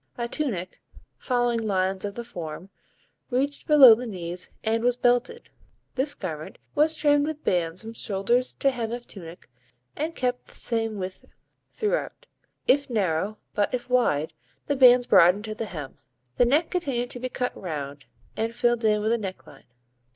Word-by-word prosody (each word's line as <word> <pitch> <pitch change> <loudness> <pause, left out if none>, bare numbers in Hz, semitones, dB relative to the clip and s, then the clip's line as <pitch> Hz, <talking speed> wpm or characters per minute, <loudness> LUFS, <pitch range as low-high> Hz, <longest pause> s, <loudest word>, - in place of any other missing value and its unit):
A 235 -1 -2
tunic, 220 - -3 0.4
following 245 -2 +1
lines 190 -3 0
of 200 - -5
the 235 - -5
form, 175 -3 -8 0.6
reached 275 +3 -1
below 280 -6 +9
the 240 +3 -3
knees 180 -3 -6
and 225 +1 0
was 245 0 +2
belted. 245 - 0 0.4
This 280 +3 -1
garment 155 -5 -6 0.2
was 310 +2 +3
trimmed 290 -1 +3
with 310 -1 -5
bands 175 +1 0
from 225 +1 -8
shoulders 230 +5 0
to 275 - +2
hem 235 -3 -4
of 240 0 -6
tunic 170 -3 -11 0.5
and 320 +3 -3
kept 250 -1 -2
the - - -14
same 225 -2 -2
width 185 -1 -6 0.4
throughout, - - -2 0.4
if 280 +1 +3
narrow; 200 -2 0 0.2
but 205 - +1
if 250 0 -7
wide, 160 -11 +2 0.3
the 285 - 0
bands 250 -2 +7
broadened 185 +1 +5
to 215 - -4
the 225 - -4
hem. 150 -9 -8 0.4
The 245 - +5
neck 295 +7 +2
continued 270 -9 -1
to 245 - -7
be 255 +1 -3
cut 250 0 -3
round, 145 -5 -6 0.3
and 225 +1 -2
filled 240 -1 +1
in 210 -1 +3
with 220 - +1
a 235 - +2
necklace. 185 -8 -8
230 Hz, 165 wpm, -25 LUFS, 190-255 Hz, 0.6 s, below